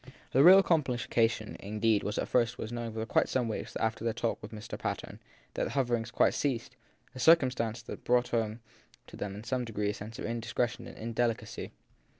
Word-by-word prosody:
The 135 - +5
real 190 +3 +9
complication 120 - +1
indeed 105 +1 +1
at 105 - -2
first 120 0 +2
was 110 - -5
that 120 -1 -4 0.2
for - - +3
some 125 -3 0
weeks 110 - -5
after 110 0 -1
their 115 -1 0
talks 115 - -1
with 105 - -8
Mr. 110 -1 -7
Patten - - -4 0.3
the - - -1
hoverings 120 -4 0
quite - - +3
ceased; 130 -2 -2 0.4
a 130 - -9
circumstance 125 -7 +3
that - - -8
brought 125 0 +2
home 115 -1 -1 0.4
to - - -12
them 100 -1 -5
in 105 - -8
some 125 +1 -1
degree 105 -3 -1
a - - -6
sense 110 +2 -8
of - - -5
indiscretion 120 +1 -2
and - - -11
indelicacy. 115 0 -2
115 Hz, 180 wpm, -30 LUFS, 110-125 Hz, 0.4 s, real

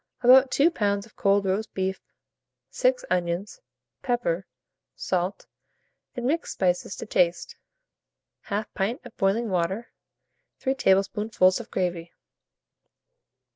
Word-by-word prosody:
About 260 +2 +7
2 300 +7 +3
lbs. 200 -7 0
of 225 - -21
cold 200 0 +2
roast 200 +3 -2
beef, 190 0 -2 0.7
6 - - +1
onions, 175 - -2 0.4
pepper, 195 -8 -1 0.5
salt, 185 +1 -2 0.7
and 245 - -4
mixed 320 +6 -1
spices 180 +1 0
to - - -7
taste; 180 -4 0 0.9
1/2 210 +1 -1
pint 210 +6 -2
of 245 - -12
boiling 205 +5 +1
water, 185 +6 -1 0.7
3 265 - 0
tablespoonfuls 195 -4 +2
of 235 - -9
gravy. 175 -2 -2
200 Hz, 110 wpm, -26 LUFS, 185-240 Hz, 0.9 s, About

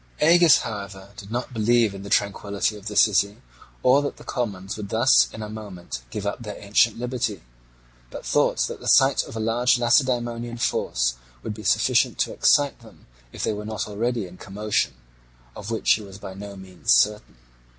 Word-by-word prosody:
Agis, 170 -1 +6
however, 100 -3 -7
did 100 -1 -11
not 125 +2 -4
believe 115 -1 +2
in 100 - -8
the 100 - -8
tranquillity 100 +1 0
of 105 0 -10
the 105 - -5
city, 100 -1 +3 0.4
or 130 +3 +5
that 145 - -4
the - - -13
commons 100 -5 -4
would 105 -2 -7
thus 115 +5 +4
in 110 - -7
a - - -5
moment 95 - -8
give 100 +10 -5
up 100 +4 -3
their 105 -3 -7
ancient 105 +2 +2
liberty, 120 - -3 0.7
but - - -9
thought - - +2
that - - -7
the - - -9
sight 135 0 +5
of - - -10
a - - -3
large 120 +3 +2
Lacedaemonian 120 -1 +1
force - - 0 0.3
would 105 - -4
be 110 - -10
sufficient 105 - +2
to - - -1
excite 145 -1 +3
them 115 -2 -18 0.3
if - - -7
they - - 0
were 105 0 -6
not 110 0 -4
already 115 +1 -2
in 90 0 -12
commotion, 105 +3 -2 0.6
of 105 +1 -8
which 115 -1 +1
he 110 - -2
was 100 -2 -11
by 95 -1 -8
no 100 +1 -9
means 95 -2 -4
certain. 105 - +2
105 Hz, 190 wpm, -24 LUFS, 100-120 Hz, 0.7 s, Agis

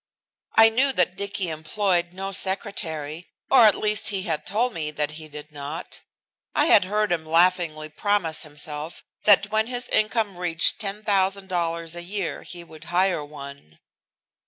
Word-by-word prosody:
I 225 0 +8
knew 260 +5 +2
that 180 -4 +1
Dicky 200 -2 -3
employed 175 +3 0
no 195 +2 -5
secretary, 180 -5 -3 0.2
or 245 -5 +8
at 210 - +5
least 215 0 +1
he 195 -3 -1
had 155 -4 -3
told 235 +5 0
me 155 -4 -3
that 150 0 -2
he 155 0 -9
did 150 0 -10
not 145 +3 -7 0.5
I - - +4
had 200 - +6
heard 210 +1 0
him 170 -2 0
laughingly 165 -1 +2
promise 175 -1 0
himself 150 +1 -5 0.2
that 205 0 +5
when 220 +1 +1
his 245 0 -3
income 215 -3 0
reached 175 0 +2
$10,000 190 -5 -1
a 175 - -5
year 190 +1 -4
he 175 -1 -9
would 160 -1 -14
hire 180 -2 +1
one. 140 - -11
180 Hz, 155 wpm, -24 LUFS, 155-205 Hz, 0.5 s, I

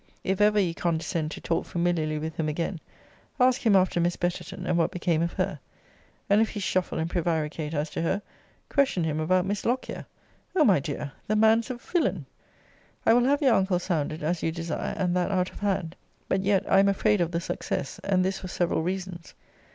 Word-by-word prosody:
If 190 +1 0
ever 210 0 +5
you 180 -4 +1
condescend 165 -2 -1
to - - -8
talk 165 0 0
familiarly 170 -3 -1
with 160 +1 -4
him 155 -1 0
again, 165 +3 -2 0.6
ask 255 +1 +4
him 220 -4 +4
after 185 -2 +3
Miss 175 +1 +1
Betterton, 180 +1 -3
and 175 - +1
what 170 -1 +2
became 175 -4 0
of 170 0 -1
her. - - -2 0.7
And 205 +2 +4
if 225 - +2
he 210 - -5
shuffle 185 -2 -1
and 160 - -1
prevaricate 160 -2 -2
as 150 +1 -2
to - - -3
her, 190 +5 0 0.4
question 275 - +2
him 155 -1 -1
about 180 +3 +2
Miss 205 +1 -2
Lockyer. 250 +3 -2 0.5
O 315 -5 +5
my 195 -8 +5
dear, 145 0 -4 0.2
the 215 - +1
man's 220 +1 +4
a 255 - -2
villain! 235 - -1 0.8
I 225 - +6
will 245 +1 +4
have 285 +3 +2
your 260 -4 +5
uncle 190 -3 +2
sounded, 160 -4 -2
as 165 +2 -1
you 165 - 0
desire, 165 -1 -3
and 180 -2 0
that 180 +1 +1
out 185 -2 0
of - - -11
hand. 190 -5 -1 0.3
But 190 - +1
yet 195 -1 +2
I - - +5
am 200 0 +5
afraid 205 0 +2
of 170 - +1
the 170 -1 -1
success; 155 - -4
and 185 -2 +2
this 190 0 -1
for 185 - -7
several 175 -2 0
reasons. 180 0 -5
180 Hz, 205 wpm, -27 LUFS, 165-200 Hz, 0.8 s, I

